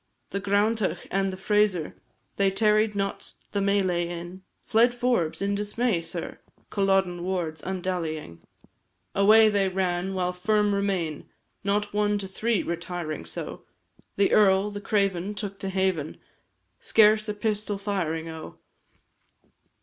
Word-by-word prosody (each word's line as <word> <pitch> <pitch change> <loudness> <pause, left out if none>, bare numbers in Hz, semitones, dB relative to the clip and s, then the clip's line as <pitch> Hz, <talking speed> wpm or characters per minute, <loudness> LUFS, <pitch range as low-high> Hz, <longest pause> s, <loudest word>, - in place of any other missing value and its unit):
The 200 - -2
Granndach 205 +1 +1
and 195 0 +1
the 185 - -7
Frazer, 200 -4 +1 0.4
They 195 -1 +3
tarried 210 +1 +2
not 195 0 -3 0.2
the 200 - 0
melee 190 -3 +1
in; 175 +2 -7 0.2
Fled 240 +2 +3
Forbes, 235 -9 0
in 200 0 0
dismay, 210 -1 0
sir, 165 0 -5 0.3
Culloden 195 -3 +1
wards, 175 -4 -2
undallying. 170 - -4 0.7
Away 215 +3 +6
they 200 -2 +2
ran, 185 0 -1
while 180 -1 0
firm 210 +3 +1
remain, 190 -6 -2 0.3
Not 205 +1 0
one 210 0 +2
to 200 -1 -4
three, 220 +3 0
retiring 170 - -4
so, 85 - -7 0.5
The 200 - +2
earl, 200 0 +4
the 205 0 -6
craven, 200 -1 0
took 200 -2 -5
to 195 - -3
haven, 190 -5 -1 0.6
Scarce 215 - +4
a - - 0
pistol 210 -1 -2
firing, 180 -6 -2
O! 160 -1 -8
195 Hz, 130 wpm, -26 LUFS, 180-210 Hz, 0.7 s, Away